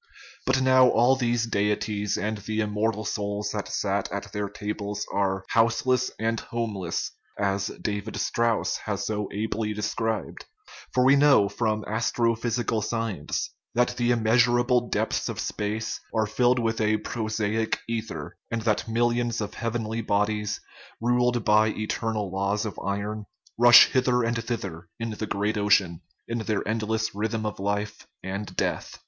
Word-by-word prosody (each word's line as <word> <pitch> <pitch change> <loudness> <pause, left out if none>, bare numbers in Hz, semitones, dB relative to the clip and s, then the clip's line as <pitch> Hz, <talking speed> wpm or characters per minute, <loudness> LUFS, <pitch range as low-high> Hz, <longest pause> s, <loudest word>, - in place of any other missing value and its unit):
But 130 0 +3
now 130 -1 +6
all 120 +3 +4
these 120 -2 +1
deities 105 -1 0
and 110 0 -2
the 110 +2 -3
immortal 110 0 0
souls 105 0 -2
that - - -3
sat - - -1
at - - -5
their 105 -1 -2
tables 105 0 -4
are 95 -1 0
" - - -26
houseless 115 +3 +2
and 115 +1 0
homeless/' 105 -7 -3 0.3
as 100 0 0
David 105 +1 -3
Strauss 115 -1 +1
has - - -2
so 105 -2 -2
ably 105 0 -2
described; 110 +1 -2 0.5
for 125 0 +3
we 135 +2 +7
know 140 -8 +5
from 110 0 -1
astrophysical 115 0 0
science 110 -8 -2 0.2
that 125 +1 +3
the 120 -1 +1
immeasurable 120 +1 +3
depths - - 0
of - - -5
space 110 +1 -3 0.2
are 110 -1 +3
filled 125 +4 +2
with 115 -2 0
a 110 0 +3
prosaic 110 0 -1
ether, 115 -1 -5
and 115 -1 -2
that 110 0 +1
millions 120 +1 +1
of 105 -1 -4
heavenly 115 -1 -2
bodies, 105 0 0 0.4
ruled 120 0 +1
by 105 +1 +5
eternal 110 -1 -2
laws 100 +3 0
of 110 - -5
iron, 100 +2 -3 0.3
rush 120 +1 +9
hither 125 -1 +2
and 115 0 -1
thither 100 -8 -4
in 115 0 -3
the 110 0 -4
great 105 +1 -1
ocean, 100 -5 +3 0.3
in 115 0 -2
their 110 -2 -1
eternal 110 0 -1 0.2
rhythm 110 +2 -2
of 105 - -4
life 105 +1 -3 0.2
and 100 +1 -5
death. - - -2
110 Hz, 150 wpm, -26 LUFS, 105-115 Hz, 0.5 s, rush